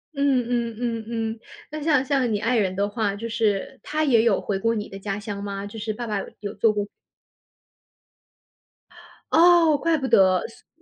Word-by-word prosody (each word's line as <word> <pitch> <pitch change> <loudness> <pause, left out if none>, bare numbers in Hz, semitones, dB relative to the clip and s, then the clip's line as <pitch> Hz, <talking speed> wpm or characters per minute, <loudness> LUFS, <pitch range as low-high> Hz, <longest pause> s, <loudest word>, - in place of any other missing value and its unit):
嗯， 275 -3 +2
嗯， 235 -2 -1
嗯， 230 -2 -2
嗯， 225 -1 -3 0.3
那 305 0 -5
像 285 -4 +2
像 260 -4 +1
你 210 - +1
爱 230 +4 0
人 190 -4 +1
的 200 +1 0
话， 205 -1 -2
就 225 +3 -5
是 215 -5 -1
他 310 +1 -2
也 250 -7 +4
有 225 -4 +2
回 195 -2 -3
过 230 +3 +1
你 210 -1 -3
的 195 - -9
家 195 0 -4
乡 205 -1 -6
吗？ 200 0 -5
就 210 +2 -8
是 215 0 -3
爸 235 +3 -5
爸 210 -3 -2
有 - - -6
有 205 0 -5
做 215 +2 +3
过 205 -1 -2 2.5
哦， 330 -2 +6
怪 325 +3 +1
不 270 -3 -3
得， 185 -2 +5
所 - - -19
225 Hz, 205 characters per minute, -24 LUFS, 205-255 Hz, 2.5 s, 哦